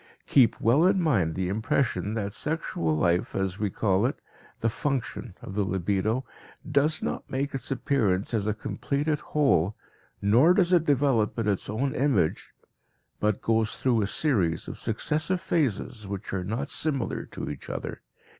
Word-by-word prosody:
Keep 125 -4 +4
well 140 +10 +4
in 190 0 +3
mind 105 - +1
the 95 -1 -1
impression 110 +2 0
that 100 -2 -3
sexual 95 - -1
life, 90 +2 +1
as 95 0 -1
we 105 -1 0
call 100 +2 +1
it, 135 - -4 0.4
the 115 - +2
function, 120 -4 -3
of 95 - -7
the 105 +1 +1
libido, 100 +6 0 0.4
does 150 +2 +2
not - - -3
make 140 +2 -2
its 135 -2 -3
appearance 115 -7 0
as 105 -2 0
a 110 - +2
completed 145 +6 -2
whole, 105 - +1 0.4
nor 125 - +5
does 185 -2 +3
it 170 -2 +4
develop 135 -7 +2
in 115 -2 -1
its 100 -3 -1
own 125 +5 -1
image, 130 - +1 0.7
but 105 -1 0
goes 110 -1 +1
through 120 -4 +2
a 100 - 0
series 100 - +1
of - - -7
successive 155 - 0
phases 125 - -1
which 100 -1 -5
are 95 -2 -1
not 115 +9 -3
similar 140 -5 -1
to - - -7
each - - -9
other. - - -5
115 Hz, 165 wpm, -27 LUFS, 100-140 Hz, 0.7 s, nor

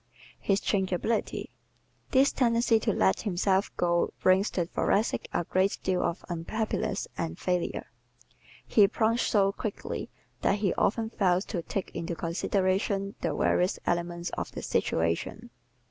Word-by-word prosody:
His 195 -1 +1
Changeability 195 +3 -1 0.6
¶ - - -30
This 270 +1 +5
tendency 235 -2 +3
to - - +1
let 95 +1 +2
himself 190 0 +1
go 175 -1 +2
brings 190 +3 +4
the 175 - -1
Thoracic 200 +5 0
a - - 0
great 185 +3 +1
deal 185 -1 +1
of 170 - -2
unhappiness 180 +6 -2
and 80 0 -2
failure. 180 -1 -1 0.8
He 205 -3 +5
plunges 230 +4 +1
so 195 -2 +3
quickly 205 +1 -5 0.3
that 200 - +2
he 200 -3 +1
often 225 +1 0
fails 185 -3 +2
to 175 - -1
take 195 +3 -4
into 170 0 -3
consideration 195 +3 0
the - - -1
various 180 +1 +2
elements 175 0 -1
of - - -4
the - - -6
situation. 85 - -1
190 Hz, 140 wpm, -28 LUFS, 175-215 Hz, 0.8 s, This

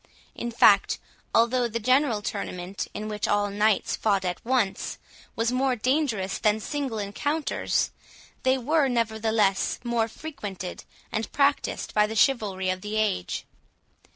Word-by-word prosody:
In 235 - -4
fact, 235 - +5 0.3
although 240 +1 +3
the 230 0 -3
general 255 -2 +2
tournament, 190 -2 -4
in 210 +1 -4
which 210 -2 -2
all 205 0 +1
knights 210 0 +2
fought 200 -3 +1
at 180 -1 -3
once, 235 -5 0 0.4
was 230 +1 +1
more 255 0 +1
dangerous 245 -6 0
than 215 0 +2
single 270 -1 -3
encounters, 290 +10 -1 0.5
they 260 0 +3
were, 290 +3 +2
nevertheless, 220 -4 +1
more 235 -2 +1
frequented 215 - -7 0.3
and 220 0 -2
practised 285 0 +1
by 210 0 +4
the 220 - -5
chivalry 200 -7 +2
of 185 0 -4
the 210 +2 -4
age. 210 - -1
220 Hz, 135 wpm, -26 LUFS, 205-255 Hz, 0.5 s, fact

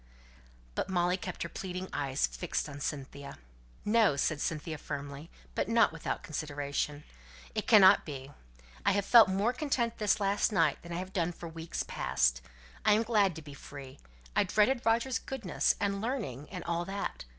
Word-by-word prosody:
But - - -2
Molly 180 -1 +2
kept 185 - -5
her - - -3
pleading 185 0 -5
eyes 140 -1 0
fixed 175 - -3
on 145 -1 -8
Cynthia. 140 -1 -5 0.5
"No!" 215 -7 +4
said 150 +2 0
Cynthia 155 -1 -3
firmly, 145 +2 -6 0.2
but - - -1
not 230 0 +5
without 165 - -4
consideration. 145 -1 -3 0.5
"It - - -3
cannot 200 -2 +8
be. 135 -2 -7 0.5
I've 200 0 +2
felt 230 -3 +8
more 200 +6 +1
content 250 -5 -1
this 210 -1 +2
last 200 +2 +1
night 180 -6 +2
than 170 - -10
I've 185 +2 -4
done 175 -3 0
for 170 - -8
weeks 165 0 -4
past. - - +1 0.4
I'm 215 +2 +4
glad 210 -6 +2
to 160 - -8
be 145 -1 -10
free. 140 -1 -10 0.4
I - - +5
dreaded 240 +4 +2
Roger's 230 +2 +2
goodness, 230 -9 0
and 200 -1 0
learning, 210 - -3
and 180 -3 -6
all 170 0 -1
that. 195 - -4
180 Hz, 160 wpm, -31 LUFS, 145-210 Hz, 0.5 s, cannot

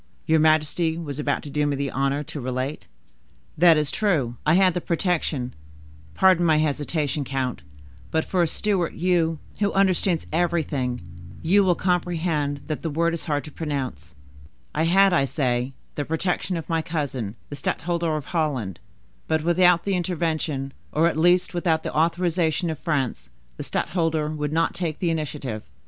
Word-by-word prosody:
Your 160 0 +3
majesty 155 +1 +2
was 150 -4 -5
about 145 -1 -1
to 145 - -8
do 150 +1 +1
me 145 - 0
the 140 0 -2
honor 140 +2 0
to 145 0 -7
relate—" 130 +3 -3 0.7
"That 170 0 +6
is 150 -2 0
true, 155 - 0
I 155 - +5
had 185 -1 +5
the 180 - -2
protection,—pardon 125 - -1
my 160 -2 +4
hesitation, 150 -1 0
count, 130 - -2 0.5
but, 160 0 0
for 185 - +1
a 170 - +3
Stuart, 190 -1 0
you, 170 -2 +1 0.2
who 205 -1 +2
understand 185 -3 +2
everything, 155 - 0 0.4
you 195 +5 +4
will 180 -2 +3
comprehend 165 -6 0
that 155 - -4
the 165 - -2
word 170 +3 +1
is 170 - -4
hard 145 -4 -1
to 150 - -10
pronounce;—I 125 - -5
had, 195 +3 +5
I 140 -6 +3
say, 125 -2 0 0.2
the 145 - -2
protection 175 +3 -1
of 165 - -6
my 165 -1 +1
cousin 135 -10 -3
the 145 - -5
stadtholder 170 +3 -1
of 150 - -6
Holland; 135 - -2 0.5
but 160 -1 +1
without 175 0 +4
the 200 - 0
intervention, 160 -6 -2 0.2
or 160 +2 +3
at - - -4
least 175 +4 +3
without 170 -2 +1
the - - -4
authorization 170 +1 +1
of 155 - -6
France, 140 -7 -2 0.3
the - - -4
stadtholder 160 -4 -1
would 150 -1 -3
not 165 +1 +1
take 165 -4 -3
the 175 -3 0
initiative. 145 -8 -3
155 Hz, 160 wpm, -24 LUFS, 140-170 Hz, 0.7 s, That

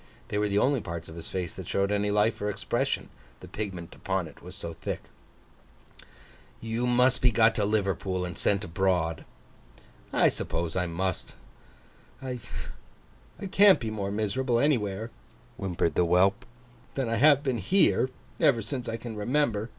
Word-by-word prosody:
They 105 - -1
were 105 0 +1
the 100 - +1
only 130 +3 +3
parts 85 -2 -6
of 80 - -10
his 85 -1 -7
face 90 -3 -3
that - - -8
showed 100 +1 +1
any 105 0 +1
life 105 +2 +2
or 105 - 0
expression, 105 - -1 0.3
the - - -11
pigment 95 -6 -5
upon 95 -3 -2
it 75 - -15
was - - -9
so 85 - -5
thick. - - -5 1.6
'You 115 +2 -2
must 125 +1 +3
be 125 - +5
got 115 0 +4
to 105 -2 0
Liverpool, 95 -3 0
and 90 -1 -6
sent 100 0 +1
abroad.' 90 -3 0 0.9
'I - - +4
suppose 85 0 -3
I 90 -1 0
must. 90 +1 -3 0.8
I 130 -2 -5 1.1
can't 195 -5 +7
be 115 -4 -3
more 100 -2 -3
miserable 110 +4 0
anywhere,' 115 -6 0 0.5
whimpered 85 -4 -1
the 90 - +3
whelp, 95 +4 +3 0.5
'than 135 -3 -1
I 115 0 0
have 145 +3 +6
been 130 -4 0
here, 130 - +3 0.3
ever 115 -5 +4
since 125 +2 -4
I 115 - -2
can 115 -1 -7
remember. 115 -1 0
105 Hz, 160 wpm, -28 LUFS, 95-120 Hz, 1.6 s, can't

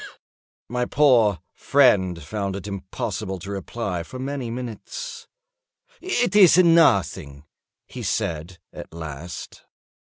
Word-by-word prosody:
My 125 0 -1
poor 120 - +3
friend 95 - +3
found 100 +3 -3
it 100 - -7
impossible 100 0 -4
to 95 +3 -8
reply 100 -2 -4
for 105 +10 -9
many 135 -2 -4
minutes. 120 -2 -7 0.7
"It 245 - 0
is 190 -5 +7
nothing," 95 - +3 0.4
he - - -9
said, 85 +3 -3 0.2
at - - -10
last. 80 0 -8
100 Hz, 105 wpm, -23 LUFS, 90-130 Hz, 0.7 s, is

